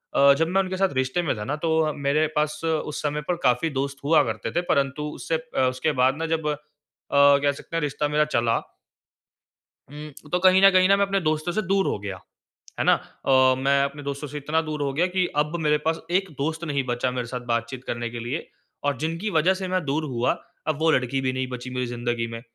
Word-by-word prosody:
अ, 140 0 +7
जब 165 0 +1
मैं 190 +2 +2
उनके 185 0 -3
साथ 195 -1 +2
रिश्ते 130 +6 0
में 155 - -1
था 105 - -4
ना, 145 - -2
तो 160 +1 0
अ, 155 -1 +1
मेरे 145 +2 +1
पास 150 +1 0
उस 155 -2 -1
समय 150 0 -1
पर 180 - +1
काफ़ी 125 +6 +2
दोस्त 140 0 -3
हुआ 155 +1 +5
करते 110 -3 -4
थे। 175 - 0
परंतु 140 +1 0
उससे 165 - -2
अ, 160 -4 -4
उसके 130 +5 -1
बाद 135 +5 +2
न 165 - -1
जब 160 -1 -1
अ, 150 - 0 0.6
कह 140 0 +5
सकते 155 +3 -9
हैं 165 - +1
रिश्ता 145 0 -1
मेरा 150 +1 +2
चला 115 -1 +2 1.3
हुँ, 150 0 -9 0.2
तो 180 - +3
कहीं 185 +1 +5
न 195 - +9
कहीं 185 0 +4
ना 200 - +6
मैं 200 0 +2
अपने 195 0 0
दोस्तों 155 +1 -1
से 215 +2 0
दूर 195 0 +1
हो - - -1
गया। 100 -2 -6 0.6
है - - +2
ना? - - +6
अ, 130 -1 +2
मैं 140 +1 +2
अपने 140 +1 -4
दोस्तों 140 +1 -4
से 150 +2 -7
इतना 150 +3 0
दूर 155 -2 -4
हो 140 -1 0
गया 170 +5 +2
कि 185 -1 +3 0.2
अब 150 +3 -7
मेरे 150 -1 +2
पास 160 0 +1
एक 190 +1 +1
दोस्त 160 +4 -2
नहीं 140 -4 -1
बचा 125 +1 -1
मेरे 125 -2 -3
साथ 125 +1 -4
बातचीत 115 +2 -3
करने 120 -2 -3
के 120 0 -6
लिए 125 +8 -4 0.4
और 145 -3 0
जिनकी 165 +8 -2
वज़ह 185 +5 +3
से 190 0 -4
मैं 185 -2 0
दूर 150 +3 -1
हुआ, 125 -3 0 0.3
अब 155 -1 0
वो 160 0 +3
लड़की 130 0 +1
भी 130 -1 0
नहीं 130 0 -2
बची 125 0 -6
मेरी 125 0 -1
ज़िंदगी 120 -1 -2
में। 115 0 -7
150 Hz, 235 wpm, -24 LUFS, 130-165 Hz, 1.3 s, न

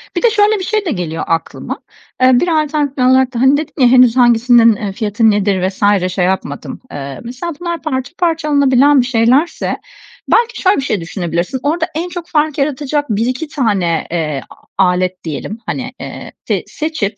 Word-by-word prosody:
Bir - - -1
de 475 - +6
şöyle 420 0 +2
bir - - -4
şey 430 +1 -1
de 335 - -1
geliyor 170 - -3
aklıma. 165 0 -3 0.4
Eee, 255 -1 +5
bir 355 - 0
alternatif 300 -3 0
yol 250 - +2
olarak 260 0 +3
da, 235 - -3
hani, 265 +2 +5
dedin 300 0 -5
ya, 250 - +7
"Henüz 250 -1 +5
hangisinin, 240 -1 +5
eee, 205 -1 -4
fiyatı 215 +1 +1
nedir 195 -2 +1
vs. 195 -1 +1
şey 180 -1 +1
yapmadım." 180 -6 -3
Eee, 140 -1 -6
mesela 250 +9 -5
bunlar 340 -1 -4
parça 260 -4 -3
parça 330 -3 0
alınabilen 280 -1 +4
bir - - -2
şeylerse, 255 +6 +1 0.5
belki 475 +1 +2
şöyle 380 +1 +3
bir - - 0
şey 215 -8 -2
düşünebilirsiniz. 175 - -3
Orada 320 +3 0
en 340 +3 -2
çok 350 -1 -7
fark 305 -2 0
yaratacak 290 +1 -1
1-2 245 +8 -1
tane, 200 - 0
eee, 155 -5 -2
a - - -14 0.3
alet 180 0 0
diyelim, 170 +7 -5
hani, 255 +1 -4
eee, - - -8 0.2
s - - 0
seçip, 295 -10 -3
255 Hz, 185 wpm, -15 LUFS, 200-300 Hz, 0.5 s, ya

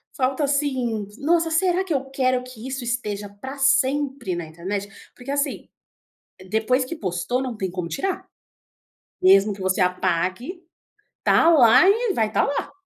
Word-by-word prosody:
Falta 265 +2 0
assim: 260 -7 -1
"Nossa, 330 +2 +1
será 360 +3 +1
que 370 -4 -3
eu 270 -2 0
quero 255 -2 +1
que 250 -1 -10
isso 265 -1 -4
esteja 210 -4 -3
pra 260 +8 -9
sempre 270 -5 +1
na 170 -1 -4
internet?". 185 +6 -5 0.3
Porque 250 +2 -7
assim, 285 -1 -2 0.8
depois 250 +5 +1
que 260 - -6
postou, 185 - -2
não 250 -3 -4
tem 190 -3 -3
como 175 -1 -4
tirar, 370 - -3 0.9
mesmo 195 +2 +5
que 195 - -10
você 190 0 0
apague, 185 - -1 0.6
tá 330 - +5
lá 300 +2 +6
e 450 +2 +2
vai 220 -9 +1
tá - - +2
lá! 280 - -2
255 Hz, 155 wpm, -23 LUFS, 200-280 Hz, 0.9 s, lá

